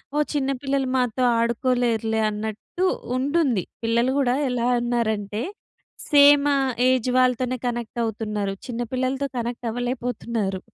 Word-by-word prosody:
ఓహ్! 300 Hz, 0 st, +2 dB
చిన్న 275 Hz, -1 st, 0 dB
పిల్లలు 275 Hz, -1 st, 0 dB
మాతో 250 Hz, 0 st, 0 dB, 0.2 s
ఆడుకోలేరులే 235 Hz, -2 st, +1 dB
అన్నట్టు 220 Hz, -, -4 dB, 0.3 s
ఉంటుంది. 270 Hz, -, +1 dB, 0.2 s
పిల్లలు 235 Hz, +3 st, +2 dB
కూడా 255 Hz, -2 st, +2 dB
ఎలా 245 Hz, -1 st, 0 dB
ఉన్నారంటే 220 Hz, -3 st, -1 dB, 0.7 s
సేమ్ 285 Hz, 0 st, +7 dB, 0.4 s
ఏజ్ 255 Hz, -1 st, +1 dB
వాళ్ళతోనే 255 Hz, 0 st, +1 dB
కనెక్ట్ 240 Hz, -1 st, -4 dB
అవుతున్నారు. 210 Hz, -2 st, -3 dB
చిన్న 240 Hz, -1 st, -4 dB
పిల్లలతో 260 Hz, +2 st, -1 dB
కనెక్ట్ 240 Hz, +1 st, -4 dB
అవ్వలేకపోతున్నారు. 235 Hz, -4 st, -2 dB
245 Hz, 110 wpm, -23 LUFS, 225-260 Hz, 0.7 s, సేమ్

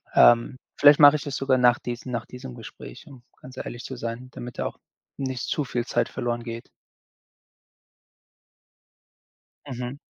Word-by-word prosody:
ähm, 120 Hz, +2 st, +5 dB, 0.2 s
vielleicht 145 Hz, 0 st, +7 dB
mache 145 Hz, 0 st, +9 dB
ich 145 Hz, -, -8 dB
das 140 Hz, -2 st, -4 dB
sogar 135 Hz, -1 st, +2 dB
nach 120 Hz, -1 st, +5 dB
diesem 120 Hz, +1 st, -6 dB
nach 115 Hz, -1 st, -3 dB
diesem 125 Hz, 0 st, -9 dB
Gespräch, 105 Hz, -, -11 dB
um 130 Hz, -4 st, -14 dB, 0.2 s
ganz 130 Hz, 0 st, -12 dB
ehrlich 120 Hz, -1 st, -6 dB
zu 130 Hz, -, -6 dB
sein, 115 Hz, +2 st, -6 dB
damit 120 Hz, -1 st, -8 dB
da -, -, -1 dB
auch -, -, -10 dB, 0.4 s
nicht 130 Hz, -4 st, -3 dB
zu 150 Hz, -, 0 dB
viel 120 Hz, -2 st, -2 dB
Zeit -, -, 0 dB
verloren 120 Hz, 0 st, -3 dB
geht. 115 Hz, 0 st, -7 dB, 3.0 s
Mhm. 125 Hz, 0 st, -5 dB
125 Hz, 155 wpm, -25 LUFS, 120-130 Hz, 3.0 s, mache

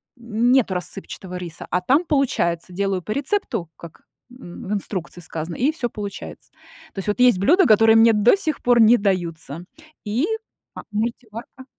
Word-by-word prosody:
нету 235 Hz, -1 st, +1 dB
рассыпчатого 180 Hz, 0 st, -7 dB
риса, 175 Hz, -2 st, -8 dB
а 180 Hz, -, +1 dB
там, 280 Hz, -, +2 dB
получается, 185 Hz, -, 0 dB
делаю 195 Hz, 0 st, -1 dB
по 210 Hz, -, -7 dB
рецепту, 265 Hz, -, -2 dB
как 170 Hz, -1 st, -13 dB, 0.3 s
н 245 Hz, -10 st, -11 dB
в -, -, -1 dB
инструкции 185 Hz, -4 st, -5 dB
сказано, 165 Hz, 0 st, -6 dB
и 275 Hz, +5 st, +1 dB
всё 260 Hz, -7 st, -4 dB
получается. 205 Hz, -2 st, -8 dB, 0.4 s
То -, -, -7 dB
есть 195 Hz, -, -6 dB
вот 210 Hz, +3 st, -1 dB
есть 250 Hz, -6 st, +5 dB
блюда, 345 Hz, -, +4 dB
которые 225 Hz, 0 st, +5 dB
мне 225 Hz, 0 st, +6 dB
до 215 Hz, -, +4 dB
сих 315 Hz, -7 st, -3 dB
пор 245 Hz, -1 st, +3 dB
не 225 Hz, +2 st, +6 dB
даются, 175 Hz, -, -3 dB, 0.4 s
и 230 Hz, -, 0 dB, 0.5 s
а -, -, -8 dB
мультиварка 230 Hz, +3 st, -5 dB
215 Hz, 165 wpm, -21 LUFS, 180-245 Hz, 0.5 s, мне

